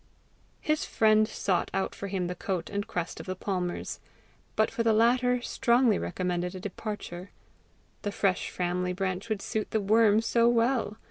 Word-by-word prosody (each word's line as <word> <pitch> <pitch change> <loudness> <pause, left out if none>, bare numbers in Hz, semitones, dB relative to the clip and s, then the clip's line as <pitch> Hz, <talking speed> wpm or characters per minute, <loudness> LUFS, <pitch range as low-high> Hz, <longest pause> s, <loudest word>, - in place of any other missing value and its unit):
His 305 0 0
friend 215 -1 +3
sought 195 -4 -1
out 195 - -1
for 200 - -6
him 190 -2 -2
the 180 - -2
coat 180 -2 -3
and 205 +1 -2
crest 175 -6 -4
of - - -9
the 185 - -2
Palmers; 180 -2 -3 0.6
but 220 - +2
for - - -2
the 225 -1 +3
latter, 245 +2 +3
strongly 240 -4 +3
recommended 180 0 -2
a - - -5
departure: 195 -2 -6 0.7
the 205 - -2
fresh 195 -2 0
family 180 0 -1
branch 190 +2 -3
would 215 -2 -2
suit 215 -1 -2
the 220 - +1
worm 215 +1 +4
so 230 +1 +3
well! 235 -2 +1
205 Hz, 165 wpm, -28 LUFS, 185-230 Hz, 0.7 s, worm